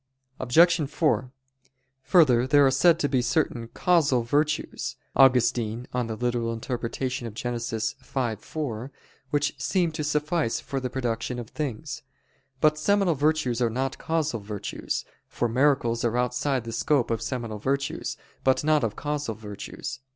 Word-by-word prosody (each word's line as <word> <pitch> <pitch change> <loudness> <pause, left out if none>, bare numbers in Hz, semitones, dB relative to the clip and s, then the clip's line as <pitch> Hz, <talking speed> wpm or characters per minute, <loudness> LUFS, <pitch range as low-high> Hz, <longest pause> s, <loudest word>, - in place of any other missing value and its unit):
Obj. 160 +4 +4
4: 150 -5 +1 0.7
Further, 130 -7 +4
there 145 0 +6
are 135 - +4
said 160 +6 +5
to 150 - +1
be 130 -3 +1
certain 120 -2 0
"causal 145 -4 +2
virtues" 150 +5 -1 0.2
(Augustine, 120 -3 +3
De - - -16
Gen. 115 - -4
ad 120 +1 -3
lit. 120 -2 -2 0.4
v, - - -6
4) 130 -4 -5 0.4
which 145 +1 +1
seem 180 -4 +1
to 155 0 -4
suffice 150 -2 0
for 135 - -4
the 125 -1 -3
production 120 -1 -2
of 120 -2 -7
things. 140 -8 -4 0.6
But 155 +1 +3
seminal 195 +1 +3
virtues 145 -4 +1
are 120 - +3
not 130 +4 -2
causal 160 -7 -1
virtues: 100 0 -4 0.2
for 120 - -1
miracles 120 -1 +2
are 120 0 +1
outside 125 +1 0
the 115 - -6
scope 125 +1 +1
of 115 - -1
seminal 115 -5 -4
virtues, 140 +5 -2 0.3
but 130 +1 +3
not 155 -2 +3
of 110 -2 -1
causal 150 -6 -3
virtues. 105 -2 -7
130 Hz, 145 wpm, -26 LUFS, 115-150 Hz, 0.7 s, there